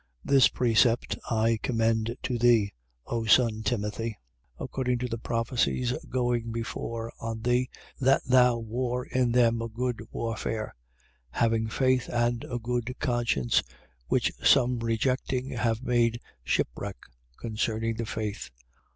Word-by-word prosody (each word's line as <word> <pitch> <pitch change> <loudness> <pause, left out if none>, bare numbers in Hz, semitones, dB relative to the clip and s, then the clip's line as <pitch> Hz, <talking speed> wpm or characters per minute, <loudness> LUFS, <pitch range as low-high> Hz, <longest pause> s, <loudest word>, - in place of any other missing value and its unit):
1:18. - - -5
This 135 -3 +8
precept, 120 0 +2
I 115 0 +2
commend 115 -1 0
to 125 -2 -1
thee, 115 -4 +4 0.3
O 115 -1 -2
son 110 -1 +4
Timothy: 110 +1 -2 0.4
according 125 -2 -1
to 125 +1 -2
the 115 -1 -4
prophecies 120 +1 0 0.2
going 120 -2 0
before 115 0 -4
on 115 -1 -4
thee, 125 +1 +2 0.3
that 135 0 +3
thou 125 -1 +5
war 120 +2 -2
in 125 -2 +1
them 115 -1 +3
a 115 - -2
good 120 +1 -2
warfare, 115 -1 -3 0.6
1:19. - - -3
Having 115 -1 +2
faith 130 0 +1
and 120 0 0
a 120 - -4
good 120 +1 -2
conscience, 120 - +1 0.5
which - - +2
some 125 -2 +4
rejecting 125 +3 -1
have 115 0 -1
made 120 -2 +2 0.2
shipwreck - - -2 0.4
concerning 115 0 -2
the 115 -1 -3
faith. 110 -2 -4
115 Hz, 135 wpm, -28 LUFS, 115-125 Hz, 0.6 s, This